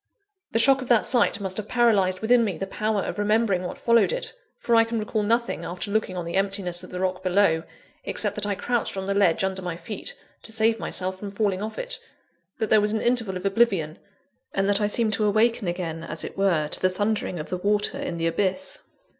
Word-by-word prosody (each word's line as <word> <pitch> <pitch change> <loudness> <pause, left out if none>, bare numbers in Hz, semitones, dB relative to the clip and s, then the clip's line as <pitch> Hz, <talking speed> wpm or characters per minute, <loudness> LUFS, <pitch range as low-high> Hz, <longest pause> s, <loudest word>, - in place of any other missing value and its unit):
The - - +1
shock 270 +3 +5
of 255 - -6
that 240 -3 +4
sight 240 -4 +3
must 190 -2 -3
have 215 -1 -3
paralysed 205 -7 +2
within 240 +1 +4
me 200 -6 -2
the 195 - -3
power 215 +1 -1
of - - -5
remembering 210 -2 +2
what - - -5
followed 235 - +3
it; - - -4 0.2
for 235 - -1
I 230 0 +7
can 230 0 -3
recall 215 0 -1
nothing, 230 -4 0
after 180 +4 -4
looking 205 -3 -1
on 175 - -3
the 170 - -5
emptiness 195 -3 0
of 185 - -10
the 180 - -6
rock 185 0 -1
below, 185 -3 +2 0.4
except - - -1
that 205 -1 -3
I 200 - 0
crouched 240 -1 -1
on 190 - -3
the 200 - 0
ledge 195 -3 +3
under 190 0 -1
my 175 -2 -4
feet, 225 - -4 0.3
to - - -11
save 225 0 +2
myself 185 -2 -2
from 205 - -6
falling 200 -2 -1
off 215 +1 -5
it - - -1 0.6
that 220 -3 -2
there 215 - +6
was 210 +1 0
an 220 - 0
interval 230 -6 +1
of 180 - -8
oblivion 195 -7 +1 0.6
and 195 0 +1
that 205 +1 +2
I 210 - +2
seemed 220 +1 +1
to 210 +1 +1
awaken 220 0 +2
again, 170 -2 -3
as 155 -1 -1
it - - -7
were, 180 -6 +1
to - - 0
the 185 - +3
thundering 205 -1 -1
of 155 - -6
the 180 - -2
water 210 +7 0
in 280 -12 -4
the 165 - -2
abyss. 185 +2 0
205 Hz, 230 wpm, -25 LUFS, 185-225 Hz, 0.6 s, I